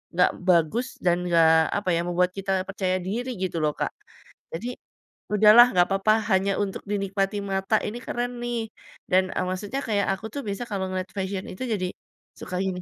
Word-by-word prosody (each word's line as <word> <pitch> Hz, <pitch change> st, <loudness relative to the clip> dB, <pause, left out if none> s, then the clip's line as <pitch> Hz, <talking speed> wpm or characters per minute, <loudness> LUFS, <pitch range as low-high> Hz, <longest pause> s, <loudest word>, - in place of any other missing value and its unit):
nggak 180 Hz, -, +4 dB, 0.2 s
bagus 180 Hz, +8 st, +3 dB, 0.2 s
dan 175 Hz, -1 st, +4 dB
nggak 165 Hz, -2 st, +5 dB, 0.3 s
apa 205 Hz, -2 st, -2 dB
ya, 165 Hz, -, +1 dB
membuat 180 Hz, +1 st, +1 dB
kita 195 Hz, 0 st, -2 dB, 0.2 s
percaya 190 Hz, -1 st, -1 dB
diri 225 Hz, +8 st, -3 dB
gitu 185 Hz, -3 st, -2 dB
loh, 150 Hz, -1 st, +1 dB
Kak. -, -, -1 dB, 0.6 s
Jadi 240 Hz, +9 st, -5 dB, 0.6 s
udahlah 215 Hz, +4 st, +8 dB
nggak 180 Hz, 0 st, +4 dB
papa, 195 Hz, +2 st, +3 dB, 0.2 s
hanya 195 Hz, +1 st, +3 dB
untuk 195 Hz, -1 st, -5 dB
dinikmati 200 Hz, 0 st, -1 dB
mata, 195 Hz, +2 st, 0 dB
ini 215 Hz, -, -5 dB
keren 245 Hz, 0 st, -2 dB
nih. 235 Hz, -2 st, -3 dB, 0.4 s
Dan, 185 Hz, +1 st, +3 dB
eee, -, -, 0 dB
maksudnya 205 Hz, +9 st, -3 dB
kayak 205 Hz, -2 st, +1 dB
aku 210 Hz, -, -10 dB
tuh 285 Hz, -, -3 dB
bisa 200 Hz, +4 st, -3 dB
kalau 195 Hz, -3 st, -2 dB
ngeliat 185 Hz, 0 st, -3 dB
fashion 190 Hz, 0 st, -3 dB
itu 185 Hz, -, -6 dB
jadi 185 Hz, -3 st, -1 dB, 0.5 s
suka 180 Hz, -, -5 dB
gini, 180 Hz, -1 st, -3 dB
195 Hz, 180 wpm, -25 LUFS, 185-210 Hz, 0.6 s, udahlah